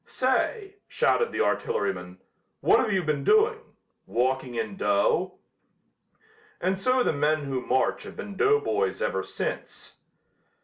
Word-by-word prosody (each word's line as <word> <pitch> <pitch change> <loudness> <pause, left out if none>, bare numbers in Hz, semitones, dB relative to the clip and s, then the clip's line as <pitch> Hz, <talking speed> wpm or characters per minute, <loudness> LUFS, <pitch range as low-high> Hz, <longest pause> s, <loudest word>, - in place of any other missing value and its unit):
"Say," 395 - -1
shouted 470 -1 +1
the - - -1
artilleryman, 470 0 -1 0.4
"what've 225 - +3
you 190 -2 +1
been 150 -3 -1
doing? 435 +1 +4 0.5
Walking 130 +1 -1
in 110 -3 -3
dough?" 105 - +1 1.2
And 190 +1 0
so 255 +4 +2
the - - +1
men 150 +1 +1
who 135 -2 -3
march 130 +1 +1
have - - -10
been 205 -1 -7
doughboys 430 - +1
ever - - -1
since. - - -6
190 Hz, 125 wpm, -26 LUFS, -, 1.2 s, doing